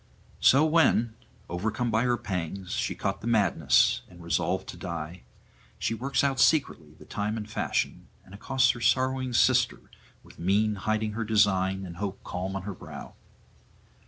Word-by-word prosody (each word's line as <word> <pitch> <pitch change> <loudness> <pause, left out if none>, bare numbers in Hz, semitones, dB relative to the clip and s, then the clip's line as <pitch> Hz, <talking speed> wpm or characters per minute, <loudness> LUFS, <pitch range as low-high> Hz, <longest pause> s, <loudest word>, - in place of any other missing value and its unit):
So 140 +4 +5
when, 155 -8 +3 0.3
overcome 110 +7 -2
by 110 +3 +2
her 120 -1 +2
pangs, 90 -1 -5
she - - -1
caught 100 0 -3
the - - -5
madness 105 -6 +3
and 90 -1 -14
resolved 90 +2 -1
to - - -7
die, 85 0 -6 0.6
she - - -1
works 135 +5 -1
out 135 -2 +1
secretly 85 - +2
the - - -15
time 105 +2 -3
and 105 -1 -5
fashion, 105 - -2 0.2
and 95 - -16
accosts 130 +5 +2
her 120 - -9
sorrowing 130 +1 +1
sister 125 +1 +3 0.4
with - - -17
mien 105 +5 +2
hiding 110 +2 -1
her 115 +2 -3
design 95 -3 +2
and 85 -1 -9
hope 100 0 -5
calm 95 +2 -4
on 95 - -4
her 100 0 -5
brow. - - -10
105 Hz, 160 wpm, -27 LUFS, 95-120 Hz, 0.6 s, So